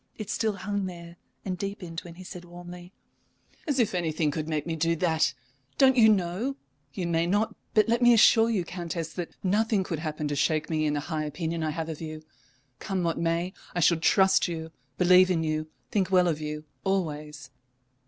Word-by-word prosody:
It 210 -2 -5
still 220 -2 0
hung 200 0 -3
there, 170 -1 -10 0.3
and 185 -2 -3
deepened 190 -4 -5
when 170 -2 -11
he 185 - -10
said, 180 -1 -9
warmly: 175 +1 -11 0.8
"As 285 -3 0
if 235 -6 +2
anything 160 -3 0
could 155 +1 -4
make 150 -2 -1
me 165 -1 -2
do 165 +1 +1
that! 160 -6 +1 0.4
Don't 265 -1 +6
you 225 -3 +7
know 200 +6 0 0.4
you 180 +5 -4
may 170 0 +1
not, 205 +4 +1 0.2
but 215 0 +5
let 235 +2 +1
me 240 0 +7
assure 225 0 +6
you, 200 -6 0
Countess 170 -2 -5
that 175 -2 -6
nothing 210 +1 +2
could 165 -4 -4
happen 155 -1 -3
to 145 - -1
shake 155 +3 0
me 155 -1 +1
in 150 - 0
the 145 - -1
high 155 0 -3
opinion 165 +2 -3
I 155 - 0
have 160 +1 -3
of 160 -1 -6
you. 155 -1 -7 0.6
Come 190 -3 -2
what 165 -1 -1
may, 170 +2 0 0.2
I - - 0
shall 170 0 +4
trust 190 +4 +4
you, 160 -2 -5 0.3
believe 180 +1 +6
in 165 -3 +1
you, 155 0 -1 0.2
think 190 -3 +1
well 180 -1 +4
of 155 -2 -1
you 150 0 -4 0.2
always." 150 -7 -3
175 Hz, 200 wpm, -27 LUFS, 160-190 Hz, 0.8 s, you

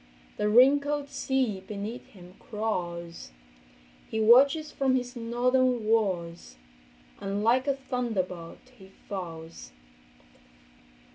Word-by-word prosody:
The 210 - 0
wrinkled 285 +5 +4
sea 265 -6 -1
beneath 205 +4 -6
him 180 -2 -15
crawls, 175 -6 -4 0.8
He 220 - -2
watches 275 +8 +5
from 265 -1 +1
his 250 0 -3
northern 245 0 +1
walls, 185 - -1 0.6
And 200 +1 -3
like 250 +4 +3
a 280 - +2
thunderbolt 230 -7 -4
he 190 0 -14 0.2
falls. 165 -4 -7
225 Hz, 95 wpm, -28 LUFS, 190-255 Hz, 0.8 s, watches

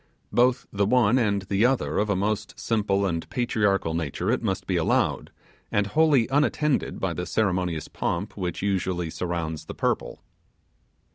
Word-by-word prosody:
Both 125 +1 +3
the 100 0 +1
one 125 +1 +4
and 100 -4 +1
the 100 +2 0
other 135 0 0
of 105 +1 0
a 100 - +2
most 100 +2 -2
simple 100 -3 +1
and 85 -3 -2
patriarchal 105 -8 +1
nature: 80 -4 -1
it - - 0
must - - -2
be - - -1
allowed, - - +1 0.4
and 105 - +2
wholly 140 +1 +3
unattended 145 0 +1
by 95 -3 -1
the 90 +1 -4
ceremonious 90 -6 0
pomp 90 +5 -3
which 90 -2 -4
usually 90 -4 -1
surrounds 80 -3 -3
the - - -8
purple. - - -2
100 Hz, 155 wpm, -25 LUFS, 90-115 Hz, 0.4 s, one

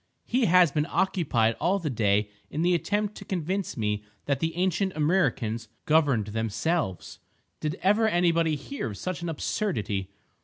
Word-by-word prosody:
He 250 0 +2
has 180 -3 +5
been 150 +1 0
occupied 125 - +1
all 190 +3 +2
the 165 -7 -3
day 105 -2 +1 0.2
in 155 - -2
the 180 +1 +3
attempt 205 +4 0
to - - -8
convince 185 0 -2
me 105 -2 -1 0.2
that 140 -2 0
the 160 +2 -1
ancient 185 +1 0
Amriccans 135 - +1 0.2
governed 145 -9 +3
themselves!—did 115 - -3
ever 210 +4 +4
anybody 170 -4 +2
hear 275 - -5
of 100 - -7
such 185 -1 -4
an 170 - -3
absurdity? 110 - -2
160 Hz, 150 wpm, -27 LUFS, 115-185 Hz, 0.2 s, has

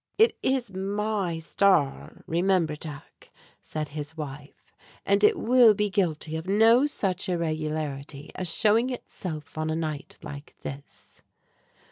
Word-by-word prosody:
"It 450 +2 +5
is 255 -6 0
my 195 -2 -1
Star, 165 -3 +1
remember, 170 -2 +1
Jack," 150 -2 -10 0.3
said 155 -1 -5
his 150 +2 -6
wife, 145 -1 -9 0.3
"and 200 +1 +3
it 210 - +5
will 240 -2 +6
be 210 0 0
guilty 160 -5 0
of 160 +2 -5
no 225 +7 +5
such 195 -8 -1
irregularity 155 -4 -3
as 180 -3 -2
showing 220 +7 +3
itself 160 - -6
on 155 0 -1
a 160 - 0
night 155 -3 -4
like 145 -2 -9
this." 140 +1 -9
170 Hz, 130 wpm, -26 LUFS, 155-205 Hz, 0.3 s, will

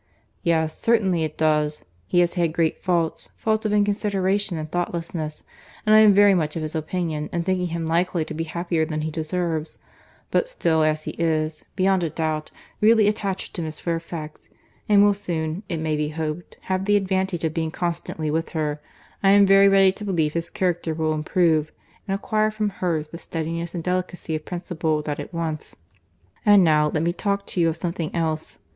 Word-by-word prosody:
"Yes, 160 -2 0
certainly 195 -7 +2
it 155 -1 -4
does. 150 -1 +1 0.2
He 175 - +3
has 175 -1 +2
had 170 -4 0
great 160 -1 0
faults, 170 -4 -1
faults 220 0 0
of - - -2
inconsideration 205 -2 +1
and 155 0 -4
thoughtlessness; 170 -3 -3 0.4
and 215 - +4
I 215 - +9
am 215 -1 +8
very 200 0 +6
much 160 -5 0
of 165 - -3
his 155 - -4
opinion 160 -1 -2
in 170 - -1
thinking 185 0 0
him 165 -1 -3
likely 170 0 +1
to - - -6
be 165 +1 -3
happier 170 0 -1
than 155 -1 -2
he 155 +1 -3
deserves: 160 0 -2 0.5
but - - +1
still 165 - +1
as 155 0 +1
he - - -4
is, 155 -2 0
beyond 190 -1 +2
a 165 - 0
doubt, 155 0 -2 0.3
really 220 -1 +5
attached 200 -2 -2
to 175 - -4
Miss 155 -1 -5
Fairfax, 165 -2 -5 0.4
and 205 -1 +6
will 205 0 +5
soon, 165 -3 -3
it 170 - -1
may 155 -1 -1
be 150 0 -1
hoped, 155 +2 -5
have 190 0 -2
the 205 0 +3
advantage 190 -3 -1
of 160 -1 0
being 160 -1 -1
constantly 165 -2 -3
with 165 +2 -1
her, 150 -1 -1 0.4
I 195 - +4
am 200 0 +7
very 195 0 +6
ready 195 -1 +6
to 210 - -9
believe 165 -7 0
his 170 0 -2
character 175 -3 -1
will 160 -1 0
improve, 155 0 +1 0.4
and 195 - 0
acquire 215 +1 +1
from 215 -1 -1
hers 165 -5 -2
the 170 - -9
steadiness 165 +1 -4
and 170 - -3
delicacy 180 -2 -2
of 155 -1 -3
principle 160 -4 -2
that 150 -1 -3
it - - -6
wants. 165 -3 -4 0.7
And 205 -2 +7
now, 150 -2 +4
let 155 - 0
me 170 +1 +1
talk 200 +1 -1
to 180 - -2
you 165 - +4
of 160 - -3
something 170 -2 -3
else. 160 -2 -2
170 Hz, 195 wpm, -23 LUFS, 155-190 Hz, 0.7 s, I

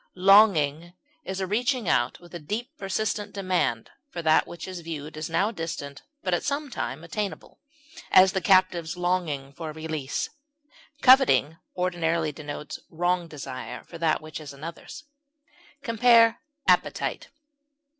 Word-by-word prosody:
Longing 180 -5 +4 0.3
is 190 0 -4
a 190 - -1
reaching 240 +3 0
out 120 - +1
with 175 0 -16 0.2
deep 235 - -3
and 315 - -53
persistent 205 +1 -2
demand 180 - -1 0.2
for 170 -9 -6
that 160 0 +4
which 170 +1 -8
is 185 -1 -6
viewed 155 -2 -7
as 155 +1 -5
now 195 +7 +1
distant 160 -7 -6 0.2
but 185 - -1
at 175 - 0
some 285 -1 -2
time 165 - -4
attainable; 185 0 -5 0.5
as, 185 0 +7
the 190 -1 -1
captive's 180 -3 +3
longing 170 -7 -1
for 160 +1 -6
release. 155 -3 -4 0.7
Coveting 255 - +6 0.2
ordinarily 170 -3 0
denotes 150 0 -7
wrong 175 +1 0
desire 130 -5 -7
for 170 - -11
that 160 -2 +1
which 155 0 -8
is 145 -2 -9
another's. 165 - -9 0.8
Compare 230 -1 +5 0.3
APPETITE. - - +1
175 Hz, 135 wpm, -26 LUFS, 155-195 Hz, 0.8 s, as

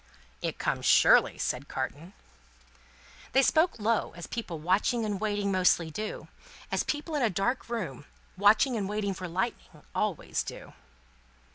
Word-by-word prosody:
"It - - -3
comes - - -1
surely," - - +6
said 130 +3 -2
Carton. 145 +7 -5 1.2
They 270 +2 +5
spoke 320 +6 +3
low, 225 +1 0
as 175 - -6
people 220 -8 -5
watching 195 +8 +1
and 205 -2 -3
waiting 205 -2 0
mostly 180 -3 +3
do; 215 +6 -5 0.4
as - - +1
people 300 +2 -3
in 295 - 0
a 235 - +3
dark 220 +7 -1
room, 170 - -4 0.3
watching 215 +6 +4
and 200 -3 -2
waiting 205 -1 -1
for 185 -1 -6
Lightning, 180 -3 -4
always 210 -7 -1
do. - - -8
205 Hz, 145 wpm, -29 LUFS, 180-230 Hz, 1.2 s, surely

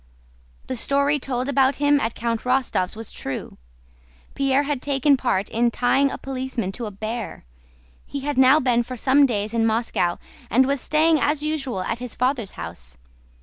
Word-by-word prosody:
The 260 - -4
story 280 +4 +1
told 255 -1 -3
about 275 -1 +3
him 290 0 +3
at 225 -3 -2
Count 230 -1 -2
Rostóv's 250 -8 0
was 225 0 -8
true. 135 - -6 0.7
Pierre 275 0 +2
had 285 -3 -2
taken 280 0 +3
part 225 -7 0
in 235 +1 +2
tying 260 +4 +2
a - - -5
policeman 260 -6 -4
to 230 +3 -5
a - - -4 0.2
bear. 225 - -5 0.6
He 280 - -5
had 290 +1 -2
now 265 +3 +6
been 245 -4 +2
for 250 +1 -6
some 275 +4 +4
days 210 -2 -2
in 230 -1 +1
Moscow 220 -6 +1 0.3
and 260 +3 +4
was 275 -1 0
staying 310 +1 +3
as 290 +1 0
usual 275 -10 -2
at 230 - -3
his 250 -1 -6
father's 250 -5 -1
house. - - -7
255 Hz, 175 wpm, -23 LUFS, 230-280 Hz, 0.7 s, now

